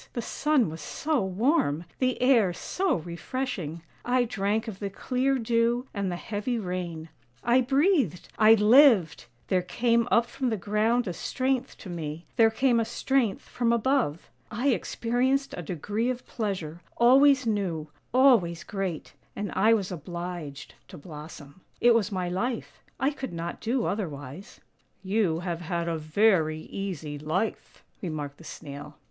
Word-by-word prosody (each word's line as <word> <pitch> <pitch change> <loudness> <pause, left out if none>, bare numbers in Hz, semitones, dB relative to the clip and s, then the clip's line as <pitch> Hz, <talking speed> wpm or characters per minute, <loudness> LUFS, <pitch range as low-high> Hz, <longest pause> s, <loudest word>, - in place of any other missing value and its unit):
The 240 - -2
sun 295 -4 +1
was 160 - -8
so 300 -7 -1
warm, 190 - +1
the 255 -1 +1
air 230 -8 +4
so 370 - -1
refreshing; 170 - -4 0.2
I 250 0 +2
drank 220 0 -1
of 200 -4 -6
the 200 - -3
clear 260 +6 0
dew 235 +1 +1
and 200 -3 -2
the - - -2
heavy 210 +6 -3
rain; 180 -5 -4 0.3
I 240 +2 +4
breathed 270 - +2
— - - -20
I 225 - +9
lived! 215 - +5 0.2
There 185 - +3
came 230 +6 +1
up 235 0 +4
from 255 +1 -2
the 220 - -1
ground 215 +4 +1
a 180 - -2
strength 260 +5 -2
to 190 - -10
me, 160 -1 -5
there 225 -2 +6
came 240 +1 +2
a - - +2
strength 240 -2 0
from 235 -1 -1
above. 235 - 0 0.2
I 240 +5 0
experienced 260 +3 0
a - - -5
degree 205 - -2
of 250 -1 -4
pleasure, 185 -8 -4 0.2
always 265 +2 +6
new, 185 -8 -1 0.2
always 230 -11 +4
great, 195 -6 -4 0.2
and 205 -1 -4
I 220 +4 +4
was 195 -4 -3
obliged 170 -3 -6
to 185 - -11
blossom. 150 0 -11 0.2
It 240 0 +6
was 220 -3 +1
my 185 -2 -2
life; 225 +7 -3 0.2
I 270 +3 +2
could 265 -7 -6
not 170 +1 -5
do 235 +1 0
otherwise." 155 - -5 0.2
' - - -43 0.2
You 165 -6 +1
have 175 -2 -3
had 170 0 -2
a 165 -1 -1
very 155 -1 +2
easy 160 -8 -5
life," 155 +9 -3 0.2
remarked 150 -5 -5
the - - -13
Snail. 145 -1 -9
205 Hz, 155 wpm, -27 LUFS, 170-245 Hz, 0.3 s, I